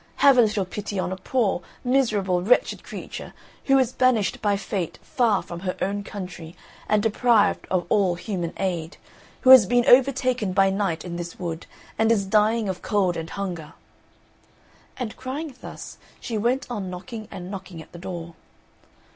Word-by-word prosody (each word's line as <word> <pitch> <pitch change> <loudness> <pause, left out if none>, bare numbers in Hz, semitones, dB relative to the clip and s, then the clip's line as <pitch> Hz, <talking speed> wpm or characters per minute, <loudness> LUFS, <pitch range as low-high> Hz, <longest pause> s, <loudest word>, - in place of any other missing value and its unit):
Have 275 -1 +6
a - - +10
little 210 -3 +1
pity 205 +2 -5
on 185 - -1
a - - -2
poor, 205 -2 0 0.2
miserable, 215 -9 +1
wretched 225 +7 +2
creature - - -8 0.3
who 270 -1 +5
is 255 -2 +2
banished 255 -6 +1
by 205 -2 +2
fate 195 -4 -4
far 225 -6 +1
from 170 - -8
her 185 0 -3
own 200 +1 -2
country 180 -5 -8 0.3
and 210 -1 +3
deprived 225 0 +2
of 180 -2 0
all 190 -3 +2
human 175 -2 -4
aid, 175 -3 -3 0.4
who 260 - +6
has 250 -7 +10
been 245 +3 +3
overtaken 255 -5 +3
by 195 0 +4
night 190 -5 -1
in 170 -1 -5
this 175 -1 -6
wood 170 -2 -5 0.3
and 220 +1 +4
is 205 -4 +2
dying 215 +2 +2
of 185 -2 -4
cold 190 -4 +1
and 165 0 -5
hunger." 175 -6 -5 1.2
And 235 -4 -4
crying 270 +4 -5
thus, - - -9 0.2
she 230 - -5
went 240 +5 0
on 200 -6 -4
knocking 215 +5 -7
and 180 +1 -8
knocking 190 -3 -8
at 160 - -12
the 175 - -10
door. 170 -2 -6
200 Hz, 170 wpm, -24 LUFS, 180-235 Hz, 1.2 s, a